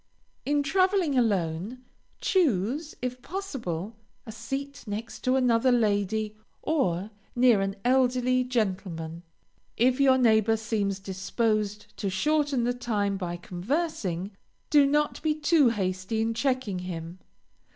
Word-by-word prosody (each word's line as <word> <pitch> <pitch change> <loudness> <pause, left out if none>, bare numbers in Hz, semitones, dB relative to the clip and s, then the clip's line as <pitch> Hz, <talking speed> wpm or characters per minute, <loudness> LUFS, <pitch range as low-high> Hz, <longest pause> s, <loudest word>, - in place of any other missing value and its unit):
In 290 0 +2
traveling 370 -2 +2
alone, 205 0 0 0.4
choose, 295 - +1
if 250 0 -3
possible, 235 - -5 0.3
a 220 - -7
seat 270 +5 -5
next 215 +3 -5
to 255 +1 +1
another 250 -1 +3
lady, 215 -2 +1 0.3
or 205 - 0 0.2
near 240 -4 +5
an 195 0 -2
elderly 255 0 +3
gentleman. 185 -9 -2 0.6
If 250 +3 +3
your 265 -1 +5
neighbor 225 -2 +4
seems 210 -3 -1
disposed 210 +2 -2
to 200 - -2
shorten 290 +5 +1
the 245 +1 +1
time 210 -5 -1
by 175 -3 -4
conversing, 190 - -3 0.4
do 290 -2 +6
not 295 +1 +1
be 310 -1 +1
too 300 -3 +4
hasty 190 0 -2
in 225 +1 0
checking 250 -6 -1
him. 175 -1 -6
230 Hz, 120 wpm, -27 LUFS, 195-265 Hz, 0.6 s, do